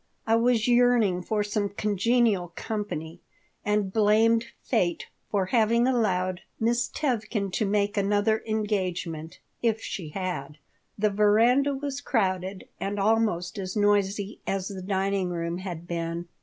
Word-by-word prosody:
I 225 - +3
was 230 -1 +2
yearning 240 -7 +4
for 210 +3 -1
some 205 0 -1
congenial 205 -2 +1
company, 180 -7 -4 0.4
and 210 -2 0
blamed 225 +2 +4 0.2
fate 180 -8 0 0.2
for 200 -3 +1
having 235 +1 +4
allowed 185 -7 +1 0.2
Miss 235 +1 +1
Tevkin 215 -7 -1
to 215 - 0
make 205 +1 0
another 205 +2 +2
engagement 185 -6 -2 0.2
if 225 -2 +1
she 175 -7 -5
had 155 -5 -4 0.4
The 210 0 +2
veranda 230 +7 +4
was 280 0 -4
crowded 190 -6 -1
and 200 +1 -2
almost 205 -4 +1
as 185 -1 -4
noisy 205 0 +1
as 195 0 -1
the 195 -2 -6
dining 195 0 0
room 170 0 -3
had 175 -3 -6
been. 170 0 -3
205 Hz, 130 wpm, -27 LUFS, 185-225 Hz, 0.4 s, yearning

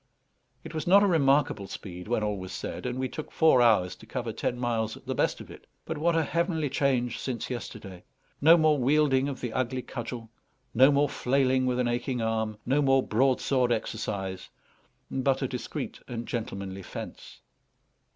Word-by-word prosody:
It - - -9
was 155 +1 -4
not 200 +3 +7
a - - +5
remarkable 140 - +2
speed, 90 -2 -8
when 110 -2 0
all 105 -1 -1
was 95 0 -7
said; - - -5
and 125 0 -3
we 130 0 -1
took 155 +3 -7
four 160 -6 +5
hours 105 -6 +3
to 110 - -15
cover 120 -1 -4
ten 120 - -2
miles 115 -3 -1
at - - -17
the - - -2
best - - 0
of - - -10
it. - - -13 0.2
But - - -4
what 170 +2 +2
a 165 - +3
heavenly 165 -2 -1
change 125 -4 0
since 130 -1 -4
yesterday! 100 -6 -7 0.4
No 165 +4 +8
more 155 -3 +3
wielding 135 0 +3
of 135 - -6
the 120 -3 -4
ugly 130 0 -1
cudgel; 120 -2 -6 0.4
no 130 +4 +6
more 145 +1 +3
flailing 130 -1 +1
with 125 -1 0
an 125 -1 +1
aching 120 +1 -1
arm; 110 -1 -1
no 140 +4 +2
more 135 -1 +4
broadsword 130 +1 +2
exercise, 95 -4 -3 0.6
but 135 +1 +1
a - - +1
discreet 125 -2 -5
and 120 -1 -5
gentlemanly 100 -4 -4
fence. - - -9
125 Hz, 180 wpm, -28 LUFS, 110-140 Hz, 0.6 s, No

